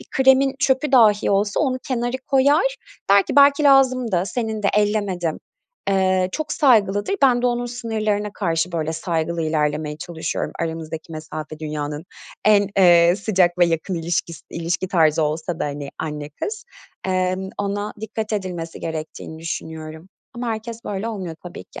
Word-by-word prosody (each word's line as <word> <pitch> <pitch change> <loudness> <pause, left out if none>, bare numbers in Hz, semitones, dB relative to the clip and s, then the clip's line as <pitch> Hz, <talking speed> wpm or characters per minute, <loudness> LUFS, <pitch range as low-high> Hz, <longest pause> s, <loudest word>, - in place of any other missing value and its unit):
bir - - -13
kremin 265 0 +4
çöpü 275 0 +1
dahi 215 -5 +5
olsa 200 +1 +1
onu 255 -3 0
kenara 245 0 -1
koyar, 290 - +3 0.3
der 200 0 +7
ki - - -4
"Belki 280 +1 +6
lazımdı, 255 -8 +4
senindi 220 -3 -1
ellemedim." 205 -6 0 0.5
Eee, 185 -1 +2
çok 310 -1 -3
saygılıdır. 210 - +3
Ben 250 -3 +4
de - - +3
onun 245 0 0
sınırlarına 215 -4 -2
karşı 170 -2 -1
böyle 160 -1 -1
saygılı 165 0 -2
ilerlemeye 150 -1 -1
çalışıyorum. 170 -2 -4
Aramızdaki 160 0 -5
mesafe 155 0 -7
dünyanın 150 0 -4 0.4
en, 205 -2 +5
eee, 175 -1 +6
sıcak 185 -4 +1
ve 175 - +6
yakın 165 +3 -1
ilişkis 165 -2 -2
ilişki 170 +2 -2
tarzı 160 -4 +3
olsa 155 +2 -2
da - - +1
hani 145 -1 -5
anne-kız. 150 - -5 0.4
Emm, 185 0 0
ona 205 +1 -2
dikkat 220 0 -4
edilmesi 180 -5 -4
gerektiğini 160 0 -6
düşünüyorum. 160 0 -6 0.3
Ama 240 0 -4
herkes 225 +1 -5
böyle 205 +2 -3
olmuyor 190 -7 -5
tabii 180 - -8
ki. - - -11
190 Hz, 145 wpm, -21 LUFS, 165-230 Hz, 0.5 s, der